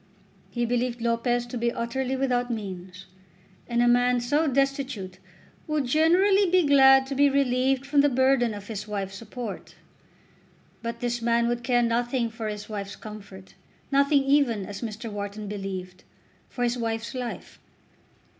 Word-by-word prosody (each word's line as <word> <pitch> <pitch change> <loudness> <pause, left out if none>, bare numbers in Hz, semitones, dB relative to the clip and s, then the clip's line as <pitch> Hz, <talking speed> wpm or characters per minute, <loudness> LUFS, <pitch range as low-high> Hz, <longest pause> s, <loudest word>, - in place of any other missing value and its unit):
He 240 -1 -1
believed 245 0 -1
Lopez 235 +1 0
to 240 0 -6
be 235 0 +1
utterly 255 +3 -2
without 250 -2 0
means, 190 -4 -6 0.6
and 240 0 +1
a - - +3
man 245 +1 +3
so 290 +7 +1
destitute 270 -9 -1 0.5
would 305 -3 0
generally 355 +8 +4
be 365 -1 +4
glad 270 -1 +6
to 275 - -5
be 285 +1 +4
relieved 265 -1 +1
from 285 0 +3
the 290 - +4
burden 260 -3 +2
of 205 -1 -9
his 210 -1 -6
wife's 200 -2 -4
support. 220 +1 -7 1.1
But 235 0 -5
this 240 -1 -2
man 235 0 +2
would 240 0 -2
care 245 -1 +2
nothing 235 0 0
for 225 -1 -5
his 210 -1 -5
wife's 200 -2 -6
comfort; 200 -3 -11 0.4
nothing 280 0 +3
even, 270 -7 +2
as 200 +1 -8
Mr. 230 0 -5
Wharton 205 +1 -5
believed, 190 -3 -6 0.5
for 245 - -3
his 245 0 0
wife's 225 +1 -3
life. 250 -2 -6
240 Hz, 155 wpm, -26 LUFS, 215-265 Hz, 1.1 s, glad